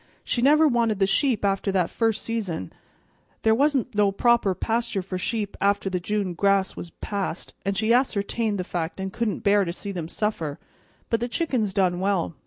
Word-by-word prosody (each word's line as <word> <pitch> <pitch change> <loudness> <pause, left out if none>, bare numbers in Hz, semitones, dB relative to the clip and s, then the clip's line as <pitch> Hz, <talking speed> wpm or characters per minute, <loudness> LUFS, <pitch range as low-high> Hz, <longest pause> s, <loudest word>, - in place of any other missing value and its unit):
"She 240 - -1
never 305 +4 +6
wanted 235 -5 +2
the 195 - +3
sheep 220 +3 +1
after 195 0 +1
that 180 -3 +1
first 225 -2 0
season. 195 - -3 0.7
There 220 - +5
wa'n't 270 -1 +1
no 205 -1 +3
proper 230 -2 +3
pasture 230 -3 -1
for 185 0 -4
sheep 205 +1 -2
after 200 -1 +1
the 180 - 0
June 200 0 -2
grass 195 +1 +2
was 175 - -7
past, 200 -4 -4
and 195 0 -1
she 220 +3 +3
ascertained 225 -3 +1
the 180 - -2
fact 175 0 -4
and 190 0 -4
couldn't 230 -3 -2
bear 200 0 +4
to 170 - -2
see 200 +3 -6
them 175 -4 -4
suffer; 165 -7 -2 0.5
but 230 - +2
the 240 - -1
chickens 245 - 0
done 185 -2 +1
well. 190 -3 0
200 Hz, 190 wpm, -25 LUFS, 190-230 Hz, 0.7 s, never